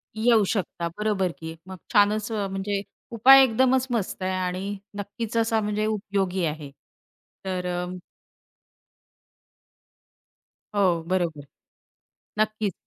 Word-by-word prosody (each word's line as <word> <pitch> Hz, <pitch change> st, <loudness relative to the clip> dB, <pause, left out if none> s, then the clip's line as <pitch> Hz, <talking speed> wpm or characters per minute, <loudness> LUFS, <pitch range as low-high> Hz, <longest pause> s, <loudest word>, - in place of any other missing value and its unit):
येऊ 220 Hz, -1 st, +4 dB
शकता 175 Hz, -4 st, -2 dB
बरोबर 205 Hz, -4 st, 0 dB
की. 160 Hz, 0 st, -7 dB
मग 190 Hz, -, -8 dB, 0.2 s
छानच 210 Hz, +1 st, +3 dB
अ, 205 Hz, -3 st, -1 dB
म्हणजे 195 Hz, +1 st, -2 dB, 0.3 s
उपाय 265 Hz, +4 st, +8 dB
एकदमच 260 Hz, +2 st, +2 dB
मस्त 215 Hz, -5 st, -2 dB
आहे 190 Hz, -, 0 dB
आणि 185 Hz, +2 st, -3 dB, 0.2 s
नक्कीच 210 Hz, +3 st, -5 dB
असा 225 Hz, -1 st, +2 dB
म्हणजे 210 Hz, +1 st, -1 dB
उपयोगी 195 Hz, -4 st, -1 dB
आहे 150 Hz, -2 st, -4 dB, 0.7 s
तर 185 Hz, -1 st, -2 dB
अ 180 Hz, 0 st, -2 dB, 2.9 s
हो, 180 Hz, -5 st, +2 dB
बरोबर, 170 Hz, -6 st, -1 dB, 0.9 s
नक्कीच. 215 Hz, -2 st, 0 dB
200 Hz, 105 wpm, -25 LUFS, 185-215 Hz, 2.9 s, उपाय